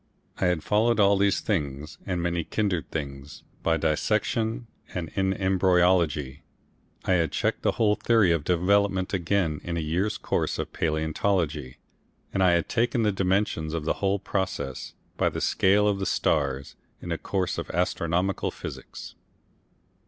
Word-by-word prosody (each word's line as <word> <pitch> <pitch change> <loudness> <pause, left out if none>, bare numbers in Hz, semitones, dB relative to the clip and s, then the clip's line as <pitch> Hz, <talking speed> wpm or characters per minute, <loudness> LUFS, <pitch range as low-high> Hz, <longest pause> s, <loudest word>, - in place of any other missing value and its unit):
I - - +1
had 90 -3 0
followed 110 +2 +2
all 100 0 +5
these 100 0 +2
things 75 -6 -3
and 90 -3 -1
many 85 -1 0
kindred 95 -3 -1
things 70 -1 -6 0.2
by 80 -1 +2
dissection 110 - 0 0.3
and 85 -3 -3
in 95 -1 0
embryology 90 -7 +2 0.6
I - - +1
had 85 -4 +2
checked - - -1
the - - +1
whole 105 -2 +3
theory 110 -4 +3
of 85 -3 +1
development 95 +3 +2
again 85 -4 0
in 85 -1 -3
a - - 0
year's 90 +7 -1
course - - -1
of - - -4
palaeontology, 80 -3 -1 0.6
and 95 - 0
I 90 -2 +5
had 85 -1 +1
taken 120 0 +1
the 105 - +3
dimensions 95 -4 0
of 80 -2 -3
the - - +2
whole 100 0 +2
process, 95 -9 -3 0.2
by - - +2
the - - -5
scale 100 +2 +3
of 100 -1 +1
the 95 - -1
stars, 70 -3 0 0.2
in 85 - -7
a 85 - -2
course 95 -2 -1
of - - -6
astronomical 90 +2 0
physics. - - -8
90 Hz, 155 wpm, -26 LUFS, 80-100 Hz, 0.6 s, all